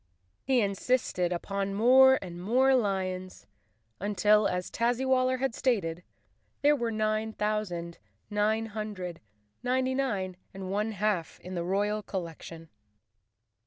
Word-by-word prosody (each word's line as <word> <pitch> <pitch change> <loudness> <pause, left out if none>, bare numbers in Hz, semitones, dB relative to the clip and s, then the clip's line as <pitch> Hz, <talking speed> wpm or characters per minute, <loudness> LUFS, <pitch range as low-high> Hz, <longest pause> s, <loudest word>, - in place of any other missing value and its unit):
He 260 -2 +3
in¬ 200 -2 +1
sisted 195 -6 0
upon 195 +2 -2
more 265 +4 +7
and 175 -1 -8
more 255 +7 +3
lions, 185 - -1 0.5
until, 210 +2 +3
as 180 0 -3
Tazzywal 255 +2 +2
ler 255 0 +1
had 265 -2 -1
stated, 180 -11 0 0.6
there 295 +1 +6
were 235 -4 -2
nine 215 0 -1
thousand 195 -6 -2 0.3
nine 215 +2 +1
hundred 205 -6 -6 0.4
ninety 255 +1 +1
nine 200 -9 -1 0.2
and 190 -1 -5
one 210 +2 -1
half 200 -4 -1
in 185 - -8
the 170 -2 -2
royal 205 +4 0
collection. 165 -4 -7
210 Hz, 125 wpm, -29 LUFS, 185-240 Hz, 0.6 s, more